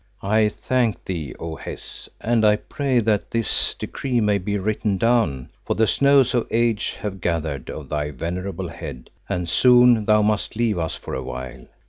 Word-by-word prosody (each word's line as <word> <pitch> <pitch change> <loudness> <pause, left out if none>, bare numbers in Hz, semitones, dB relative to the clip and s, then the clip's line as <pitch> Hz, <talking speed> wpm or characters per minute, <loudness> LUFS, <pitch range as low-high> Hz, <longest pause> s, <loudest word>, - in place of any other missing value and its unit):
"I 105 +2 +3
thank 115 -3 -1
thee, 80 -8 -4
O 80 -1 -5
Hes, - - -8
and 115 -1 +1
I 105 0 +6
pray 135 +3 -2
that 105 -2 0
this 115 -2 0
decree 130 -3 -2
may 105 -2 +2
be 100 +2 -2
written 105 0 -1
down, 110 - +1
for - - -1
the 110 - +3
snows 140 +1 +4
of 120 -2 +1
age 115 -2 0
have 95 -2 -5
gathered 80 -6 -2
on - - -7
thy 75 -1 -1
venerable 90 +5 -4
head 65 -5 -9 0.2
and 90 -1 -2
soon 125 +3 +5
thou 105 -1 +4
must 105 +1 0
leave 110 -5 +1
us 80 -1 -2
for - - -8
awhile. 65 0 -6
105 Hz, 170 wpm, -22 LUFS, 85-115 Hz, 0.2 s, I